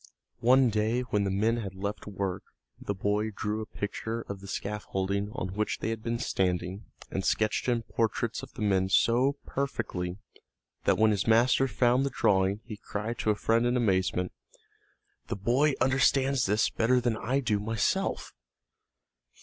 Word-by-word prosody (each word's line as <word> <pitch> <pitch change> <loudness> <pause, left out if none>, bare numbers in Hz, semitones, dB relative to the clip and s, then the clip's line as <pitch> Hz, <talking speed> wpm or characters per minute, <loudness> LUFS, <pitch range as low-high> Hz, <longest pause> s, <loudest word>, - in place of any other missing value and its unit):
One 125 0 +5
day 110 +3 +1
when 105 -5 0
the - - 0
men 110 +5 +1
had 100 -5 -5
left 100 +2 -4
work 100 -2 -3 0.4
the 100 - -3
boy 105 +3 0
drew 110 +1 -3
a 110 - -6
picture 110 +3 -4
of 100 -3 -7
the 100 - -11
scaffolding 100 0 -2
on 95 - -3
which 105 +1 -1
they 110 - -2
had 115 -1 -4
been 115 +1 -2
standing 90 -1 -1 0.3
and 95 - -2
sketched 110 +4 +1
in 120 -2 +1
portraits 115 0 -1
of - - -10
the - - -4
men 95 -2 +2
so 120 +7 +3
perfectly 90 -10 -3 0.7
that - - +3
when 110 0 +4
his 100 0 -1
master 120 +4 +4
found 120 +3 +2
the 140 - 0
drawing 100 -4 +2
he 110 -3 -7
cried 105 +3 -5
to - - 0
a 105 - +3
friend 115 +3 +2
in 125 +1 +1
amazement, 95 -5 +1 1.0
"The - - -2
boy 125 +9 +2
understands 130 0 +3
this 105 +3 +2
better 125 +3 +2
than 120 -2 0
I 125 +5 0
do 110 -6 0
myself!" 110 +1 -1
110 Hz, 165 wpm, -29 LUFS, 100-120 Hz, 1.0 s, One